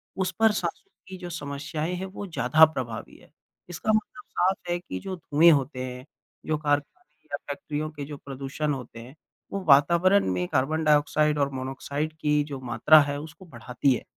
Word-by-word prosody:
उस 190 -1 -1
पर 225 0 +5
साँसों 175 -5 -3 0.2
की 190 0 -8
जो 180 -1 -7
समस्याएँ 150 +1 -4
हैं, 185 +1 -4
वो 190 +2 -7
ज़्यादा 160 -2 +5
प्रभावी 125 -8 -6
है। - - -20 0.4
इसका 175 +5 -1
मतलब 215 +3 -2
साफ 190 +2 +1
है 175 - +1
कि 95 - -6
जो 190 - -5
धुएँ 165 0 +4
होते 135 -3 0
हैं, 125 0 -7 0.4
जो 155 - 0
कारखाने 150 - -3
या - - -1
फैक्ट्रियों 155 - -4
के 145 -2 -7
जो 145 0 -8
प्रदूषण 140 +2 -4
होते 125 -3 -8
हैं, 125 +5 -12 0.4
वो 195 -1 -3
वातावरण 170 +7 +5
में 90 -1 -1
कार्बन 155 - 0
डाइऑक्साइड 150 0 +3
और 140 -1 +2
मोनोक्साइड 135 +4 -4
की 150 -1 +2
जो 145 -2 -7
मात्रा 150 +5 +5
है 145 0 -2
उसको 160 +5 -11
बढ़ाती 125 -1 0
है। 125 - -4
150 Hz, 180 wpm, -26 LUFS, 140-170 Hz, 0.4 s, पर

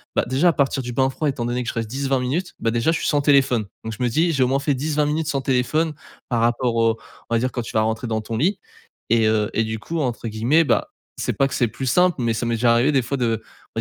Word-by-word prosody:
Bah, - - +3
déjà 135 +8 +2
à - - +2
partir 135 -1 +1
du 120 0 -5
bain 130 +2 +2
froid, 150 +3 -2
étant 130 -3 -3
donné 120 +1 -1
que - - -9
je - - -4
reste 115 -2 -3
10-20 135 +1 -1
minutes, 155 +9 -2
bah, 115 - +1
déjà 120 +7 +1
je 160 - 0
suis - - -2
sans 145 - +2
téléphone. 135 -6 +3 0.2
Donc 110 - -5
je - - -1
me - - +3
dis: 165 +8 +2
«J'ai 140 -4 +2
au 125 - +2
moins 135 +1 +1
fait 140 +1 0
10-20 150 +2 0
minutes 150 +1 -1
sans 140 -3 -1
téléphone» 140 +5 +1 0.4
par 120 -3 +1
rapport 120 0 +1
au 115 -1 +2 0.3
on 115 - +1
va - - +3
dire 130 +2 -1
quand 120 - -3
tu - - -8
vas 110 - +3
rentrer 110 +2 -1
dans 110 -1 -1
ton 110 +1 -4
lit 180 - +1 0.5
et 115 -1 +3
heu 110 -1 +1
et 115 - +1
du 110 0 -3
coup, 165 +8 -4
entre 120 -3 -2
guillemets, 120 +10 +3
bah, - - +1 0.3
c'est - - -1
pas 135 - +2
que - - -7
c'est 120 - +2
«plus 130 - -6
simple» 180 +6 +3
mais 115 -1 +1
ça 115 +2 -2
m'est 115 0 0
déjà 115 +1 +3
arrivé 120 +5 +3
des 135 - +3
fois 140 +4 -2
de 115 -3 0 0.3
on - - -1
125 Hz, 295 wpm, -22 LUFS, 115-140 Hz, 0.5 s, Bah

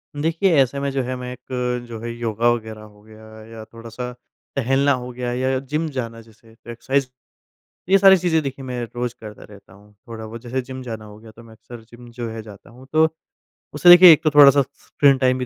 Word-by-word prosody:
देखिए, 165 +5 0
ऐसे 135 +1 -1
में 140 0 -2
जो 135 0 -2
है 130 +1 -4
मैं 125 0 -7
एक 125 -1 -4
जो 115 -1 -8
है 120 0 -5
योगा 115 0 -1
वगैरह 110 -2 -5
हो 105 -1 -17
गया 110 0 -16 0.2
या 115 0 -11
थोड़ा-सा 115 +2 -9 0.4
टहलना 135 +1 +1
हो 125 - -8
गया 125 0 -4
या 130 +1 -1
जिम 150 +5 -3
जाना 115 -2 -5
जैसे 115 0 -21
एक्सरसाइज़ 120 +4 -3 0.8
ये 195 +1 +5
सारी 195 0 +7
चीजें 170 -2 +1
देखिए 135 -1 -6
मैं 125 -1 -5
रोज़ 120 0 -4
करता 105 -2 -11
रहता 100 -2 -17
हूँ। 100 +2 -20 0.2
थोड़ा 110 -1 -8
बहुत 115 +1 -10
जैसे 125 +2 -3
जिम 130 +1 -9
जाना 110 -3 -7
हो 105 0 -13
गया, 110 0 -15
तो 115 +2 -16
मैं 115 -1 -16
अक्सर 120 +2 -13
जिम 120 0 -14
जो 120 -1 -6
है 110 0 -7
जाता 105 -2 -15
हूँ, 125 +3 -16
तो 160 +1 +4 0.7
उससे 150 +4 +4
देखिए 175 0 +10
एक 155 0 +4
तो 155 - +3
थोड़ा-सा 140 -1 +7
स - - -3 0.2
स्क्रीन 140 -2 +3
टाइम 130 -1 +1
भी 125 - -3
125 Hz, 220 wpm, -20 LUFS, 115-135 Hz, 0.8 s, देखिए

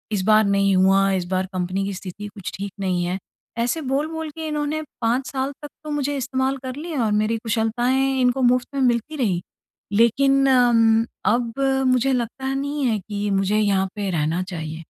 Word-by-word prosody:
इस 190 - 0
बार 215 0 +6
नहीं 200 -1 +3
हुआ, 195 +1 +4
इस 185 -2 0
बार 185 0 +1
कंपनी 185 +2 -1
की 200 - -3
स्थिति 190 +2 -7
कुछ 190 - -5
ठीक 200 0 -5
नहीं 180 -2 0
है। 180 +2 -2 0.5
ऐसे 315 +7 -1
बोल-बोल 310 +3 -2
के, 320 +1 -6
इन्होंने 300 +1 -2 0.2
5 245 +3 +1
साल 270 +1 -2
तक 295 - -6 0.2
तो 305 - -7
मुझे 290 -1 -1
इस्तेमाल 260 +1 -1
कर 255 0 -5
लिया 300 -5 -3
और 210 - 0
मेरी 225 +1 0
कुशलताएँ 245 +4 +1
इनको 250 +1 +2
मुफ़्त 250 -1 -1
में 275 - 0
मिलती 245 +5 +1
रहीं। 190 -9 0 0.6
लेकिन 275 +4 +4
उम्म, 230 -3 +4 0.2
अब 235 +2 +1 0.4
मुझे 260 +1 +2
लगता 260 +3 -2
नहीं 285 0 -2
है 220 -4 +1
कि 205 +1 -4
मुझे 205 +2 +1
यहाँ 195 -2 +2
पे 200 -2 -2
रहना 165 +2 0
चाहिए। 160 -1 -6
235 Hz, 185 wpm, -22 LUFS, 195-270 Hz, 0.6 s, बार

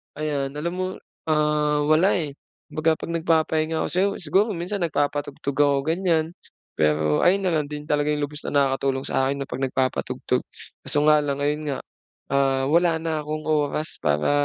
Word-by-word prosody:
Ayan, 145 -2 -2
alam 160 +4 -2
mo, 185 - -1 0.4
ah, 150 -1 +2
wala 155 +6 +4
eh. 155 -6 -2 0.4
Kumbaga 160 +1 +2
'pag - - -5
nagpapahinga 160 -1 +1
ako - - -1
sa'yo 190 +3 +2
siguro 190 +7 +2
minsan 180 +3 -3
nagpapatugtog 145 -3 -2
ako 145 -1 +4
ganyan. 165 0 +1 0.5
Pero 75 0 +2
ayun 190 +3 +4
na 185 -2 +1
lang 150 - -1
din 150 +1 -8
talaga 150 0 +2
yung 150 - -2
lubos 150 +1 -5
na - - -3
nakakatulong 135 -1 +1
sakin 135 +1 0
na - - -9
'pag 130 +2 -4
nagpapatugtog. 130 0 -1 0.4
Kaso 135 +2 0
nga 155 0 +7
lang 140 -1 -2
ayun 150 +1 0
nga, 135 - -3 0.5
ah, 135 -1 +2
wala 170 +1 +3
na 160 -2 -1
kong 155 0 -3
oras 155 0 -1
para, 75 0 +1
150 Hz, 170 wpm, -24 LUFS, 140-160 Hz, 0.5 s, nga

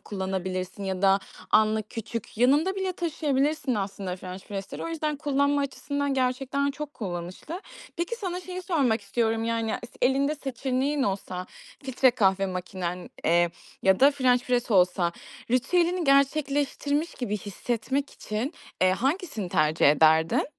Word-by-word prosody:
kullanabilirsin 190 0 -4
ya 190 -1 -3
da 195 0 +5 0.3
anlık, 215 0 +3
küçük, 225 -1 -6
yanında 290 +10 +4
bile 380 -1 -1
taşıyabilirsin 300 -5 0
aslında 195 -2 -3
french 185 0 -8
press'leri. 195 -1 -5
O - - -3
yüzden 310 -2 -2
kullanma 285 -1 +1
açısından 285 0 -2
gerçekten 265 +2 0
çok 295 +1 -7
kullanışlı. 185 - -5 0.4
Peki, 345 +7 -2
sana 365 -5 -4
şeyi 365 0 -6
sormak 275 - +1
istiyorum, 225 +2 0
yani, 230 -1 0
s 240 - -5
elinde 275 +4 +3
seçeneğin 270 +1 -1
olsa, 185 -4 -3 0.4
filtre 265 0 +4
kahve 195 -5 +2
makinen, 180 -1 -4 0.2
eee, 170 +1 +4 0.3
ya 190 0 +4
da 275 +2 +8
french 255 -3 +2
press 245 -1 0
olsa 180 -3 +3 0.4
ritüelini 340 +8 +2
gerçekleştirmiş 285 +2 +1
gibi 210 -5 -2
hissetmek 240 +7 -2
için, 220 +8 -4 0.3
eee, 185 - +5
hangisini 270 - -1
tercih 155 -1 +3
ederdin? 160 - +4
250 Hz, 135 wpm, -27 LUFS, 195-285 Hz, 0.4 s, da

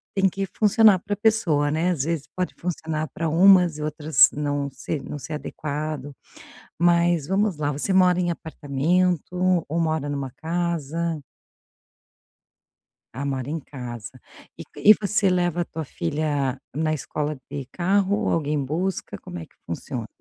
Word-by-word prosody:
têm 195 -1 +4
que 195 +2 -3
funcionar 210 -2 +5
para 205 - -4
a - - -3
pessoa, 175 -10 +2
né. 160 +4 +1
Às 155 -7 -1
vezes 160 -2 -2
pode 185 0 -2
funcionar 160 -2 -3
para 165 -1 -1
umas 180 -1 +6
e 150 - -6
outras 150 -2 +4
não 145 -1 -2
ser 135 +2 -5
não 145 - -6
ser 155 +3 -7
adequado. 150 -1 -4 0.7
Mas, 170 -3 +3
vamos 195 -1 +1
lá, 145 -1 0
você 150 +7 -1
mora 180 -1 +5
em 175 -1 +1
apartamento 175 +4 0
ou 165 +3 -1
mora 155 -3 0
numa 140 -3 -3
casa? 170 -1 -2 2.0
Ah, 140 - -3
mora 135 -2 -2
em 160 +3 -2
casa, 125 -6 -8 0.4
e - - -7
e 215 - +8
você 205 -1 +2
leva 175 -1 +1
a - - -1
tua 160 -1 -6
filha 140 - -2 0.2
na 155 +1 +1
escola 150 0 -3
de 140 -3 -5
carro 195 +2 +2
ou - - +1
alguém 150 -2 0
busca, 180 +7 -3
como 180 -1 -8
é 165 - -7
que - - -31
funciona? 110 +7 -5
160 Hz, 155 wpm, -24 LUFS, 145-180 Hz, 2.0 s, e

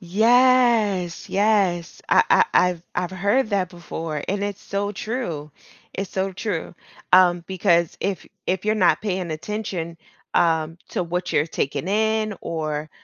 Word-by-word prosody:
Yes, 220 -2 +3
yes, 195 -4 +1
I - - +6
I 460 - +6
I've 180 -2 +3
I've 180 0 -1
heard 205 +6 +1
that 195 -3 +1
before, 165 -3 -5
and 200 +1 -1
it's 205 0 -4
so 205 +1 -3
true, 190 - -4 0.4
it's 195 0 -4
so 190 0 -2
true, 185 -4 -4 0.4
um, 175 -2 +5
because 175 -3 +1
if 195 -1 -3 0.2
if 185 +2 -1
you're 215 0 +2
not 185 -5 +3
paying 185 -5 -2
attention, 170 -1 -4 0.4
um, 165 0 +2
to - - -1
what 180 +1 -3
you're 150 - +2
taking 140 +2 -3
in, 215 0 +1
or, 155 -2 -3
185 Hz, 145 wpm, -23 LUFS, 170-210 Hz, 0.4 s, I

